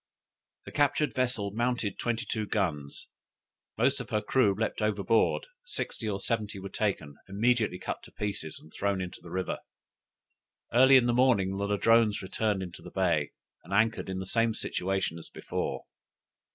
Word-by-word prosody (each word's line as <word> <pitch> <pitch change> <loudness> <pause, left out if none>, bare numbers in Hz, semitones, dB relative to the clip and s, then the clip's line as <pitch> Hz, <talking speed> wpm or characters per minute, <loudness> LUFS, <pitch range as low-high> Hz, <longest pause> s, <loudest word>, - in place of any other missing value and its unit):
The - - -8
captured 145 +1 +2
vessel 125 -6 0
mounted 120 -2 -1
twenty 120 +1 -1
two 110 -2 -2
guns. 80 -10 -2 0.7
Most 130 +5 +3
of 125 - -6
her 105 - +1
crew 105 -1 +2
leaped 110 +1 -2
overboard; 105 +1 +2 0.2
sixty 115 - -3
or 100 -1 -2
seventy 110 -2 -1
were 100 0 -6
taken, 80 -10 -2
immediately 110 -1 +2
cut 95 - -4
to - - -14
pieces, 100 -7 -3
and 80 - -16
thrown 100 -1 0
into 90 -1 -6
the - - -11
river. 95 0 -2 1.1
Early 130 +2 +8
in 125 - +4
the 120 - +2
morning 115 -7 +3
the 100 +1 -1
Ladrones 110 +1 +3
returned 100 0 -1
into 90 -1 -8
the - - -10
bay, 85 -6 +1 0.3
and - - -14
anchored 110 0 +2
in 95 - -3
the 95 - -4
same 115 +2 +2
situation 95 -5 -1
as - - -12
before. - - -4
105 Hz, 165 wpm, -29 LUFS, 95-115 Hz, 1.1 s, Early